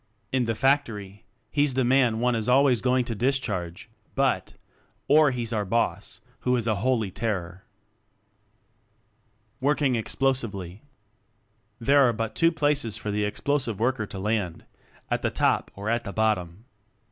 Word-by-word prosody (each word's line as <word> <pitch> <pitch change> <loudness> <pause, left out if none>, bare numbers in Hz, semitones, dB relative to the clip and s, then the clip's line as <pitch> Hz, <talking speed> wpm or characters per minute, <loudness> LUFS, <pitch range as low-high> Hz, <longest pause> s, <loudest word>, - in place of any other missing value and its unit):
In 130 -2 +1
the 115 -1 -1
factory, 110 -7 0 0.3
he's 145 -3 +1
the 130 - +2
man 125 -3 +3
one 125 +1 +2
is 115 0 -1
always 130 -2 +4
going 125 -1 +2
to 120 - -3
discharge, 110 -8 -2 0.3
but... 135 -1 0 0.5
Or 150 +1 +6
he's 120 -3 -3
our 105 -2 0
Boss, 100 -2 -2 0.2
who 125 0 +1
is 120 -3 0
"a 110 -3 +1
Holy 115 -2 0
Ter 95 -5 -2
kror." 90 +2 -18 2.0
Working 140 -1 +2
Explosively. 110 -6 -2 1.0
There 140 +5 +4
are - - 0
but 115 0 -3
two 165 0 +3
places 145 -8 0
for 105 - -4
the 105 +1 0
Explosive 120 0 -1
Worker 120 -2 0
to 100 - -8
land 100 -4 -2 0.5
at - - 0
the - - 0
top - - +1
or 100 +2 -6
at 115 +1 0
the 100 - -6
bottom. 105 -2 -1
115 Hz, 150 wpm, -26 LUFS, 105-130 Hz, 2.0 s, Or